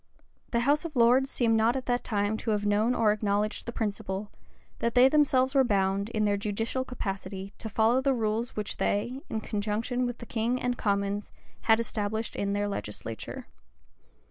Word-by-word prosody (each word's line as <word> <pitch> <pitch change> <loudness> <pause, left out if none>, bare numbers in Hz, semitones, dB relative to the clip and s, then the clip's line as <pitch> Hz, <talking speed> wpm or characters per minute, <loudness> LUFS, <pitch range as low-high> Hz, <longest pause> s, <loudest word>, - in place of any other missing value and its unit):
The 235 - +1
house 285 +4 +2
of 330 -3 -6
lords 250 +3 +4
seem 230 -4 +2
not 225 +3 +3
at 260 - -3
that 245 0 0
time 205 -1 0
to 225 - -4
have 210 -1 0
known 215 +4 +2
or 220 -2 +4
acknowledged 210 +1 -1
the - - -2
principle, 205 -2 -3 0.5
that 235 +1 -1
they 250 +1 +8
themselves 265 -2 +3
were 270 -2 +5
bound, 200 -2 +1
in 215 -2 0
their 205 -1 +2
judicial 225 +5 -2
capacity, 195 -5 -5
to 220 - -4
follow 225 +4 +3
the 270 0 +2
rules 225 +1 0
which 210 -1 -3
they, 240 +6 -1
in 220 - -2
conjunction 220 +4 -1
with 245 -1 -4
the 235 - -9
king 235 +2 -1
and 245 0 -1
commons, 200 -1 -1 0.4
had 225 0 +5
established 220 0 -2
in 200 0 -1
their 205 0 0
legislature. 110 - -5
220 Hz, 180 wpm, -28 LUFS, 205-245 Hz, 0.5 s, they